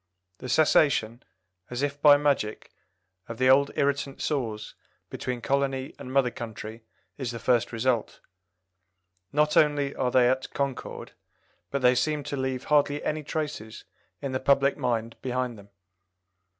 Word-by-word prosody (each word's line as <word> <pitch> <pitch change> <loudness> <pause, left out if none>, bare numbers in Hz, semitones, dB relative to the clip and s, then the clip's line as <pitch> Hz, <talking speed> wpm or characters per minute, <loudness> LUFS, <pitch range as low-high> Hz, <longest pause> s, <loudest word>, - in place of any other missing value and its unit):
The 130 - -7
cessation, 125 -5 +3 0.5
as 125 +3 -3
if 145 0 -2
by 145 -1 +8
magic, 140 -7 -1 0.6
of 115 - -6
the 130 +1 +4
old 140 +1 +5
irritant 140 -1 -1
sores 115 -8 -3 0.4
between 125 -1 -4
colony 135 0 -1
and 130 - -8
mother 130 -2 +2
country 110 -1 -8 0.4
is 130 -3 -3
the 120 - -5
first 120 0 +1
result. 120 0 -1 1.1
Not 150 +1 +2
only 145 -2 +3
are 125 - 0
they 125 -1 +4
at 130 +1 0
concord, 140 -2 -4 0.6
but 140 -1 -3
they 125 0 +6
seem 150 +3 0
to 145 0 -4
leave 130 -1 -2
hardly 145 -1 +2
any 155 0 -1
traces 150 -8 -5 0.4
in 140 - -2
the 130 - -1
public 140 +1 +3
mind 115 -4 -2
behind 125 -1 -2
them. 100 -1 -15
130 Hz, 145 wpm, -27 LUFS, 120-140 Hz, 1.1 s, by